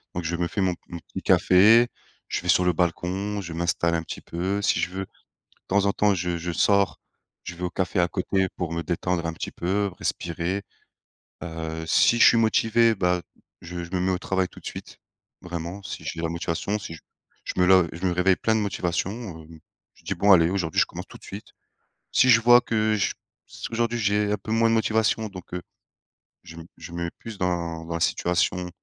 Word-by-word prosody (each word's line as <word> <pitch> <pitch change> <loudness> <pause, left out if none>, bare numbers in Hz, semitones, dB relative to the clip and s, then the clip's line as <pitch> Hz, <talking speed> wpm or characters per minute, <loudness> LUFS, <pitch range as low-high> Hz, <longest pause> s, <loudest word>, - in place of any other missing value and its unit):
Donc 90 - -2
je 85 +2 -1
me 85 -1 0
fais 100 +3 -3
mon 90 -1 +2 0.2
mon 85 - -6
petit - - -8
café, 110 +6 +6 0.4
je - - -2
vais 90 - -8
sur 90 - +5
le 90 - +4
balcon, 95 +4 -1
je 85 -2 -8
m'installe 85 0 0
un 80 - -1
petit - - -7
peu, 95 +4 -2
si - - +2
je - - 0
veux 95 +1 -4
de - - -30 0.6
temps 100 +1 +3
en 100 - +2
temps, 105 -1 +3
je 90 -1 -2
je 85 +1 -4
sors, 100 +3 +2 0.4
je 90 - -7
vais 90 - -8
au 90 - 0
café 95 +1 -1
à 85 - +3
côté 95 0 0
pour 85 -2 -3
me 85 0 -2
détendre 85 0 -1
un 85 - -1
petit - - -6
peu, 100 +3 -1
respirer. 90 +4 -2 0.8
Heu, 80 -1 -5
si 120 - +4
je - - +8
suis 115 - +5
motivé 115 0 +3
ben 90 -1 +1 0.4
je 85 0 -6
je 85 - -14
me 90 - -1
mets 95 +1 +1
au - - 0
travail 95 -1 0
tout - - -14
de - - -18
suite, - - -8 0.4
vraiment 90 +3 -6
si - - -7
j'ai 85 - -4
la 80 - -1
motivation 85 +5 -2
si 90 -5 -7
je - - -13 0.5
je - - -3
me - - +5
lov 95 -3 +5
je 90 +3 -5
me 90 - +2
réveille 90 +1 +3
plein 110 0 +1
de - - +2
motivation, 90 -2 -1 0.3
hem. 80 0 -14 0.4
Je - - -23
dis: - - -1
«Bon 100 0 +4
allez 85 -1 +5
aujourd'hui 90 -5 0
je - - +4
commence - - -8
tout - - -12
de - - -24
suite». - - -9 0.6
Si 130 - +5
je 115 -1 +7
vois 120 +1 +7
que 110 -1 +1
j 100 - 0 0.3
si - - -7
aujourd'hui 120 +1 0
j'ai 105 0 +1
un 105 - +1
peu 110 +3 -7
moins 115 0 +3
de - - +2
motivation 110 0 +1
donc 90 -2 -11
heu, 90 - -3 0.8
je 80 +1 -12
me 80 - -9
je 85 - -10
me 85 0 -3
mets 85 - -4
plus 115 -3 -8
dans 85 -3 -2
dans 85 - -5
la - - -2
situation 90 0 0
90 Hz, 225 wpm, -25 LUFS, 85-100 Hz, 0.8 s, je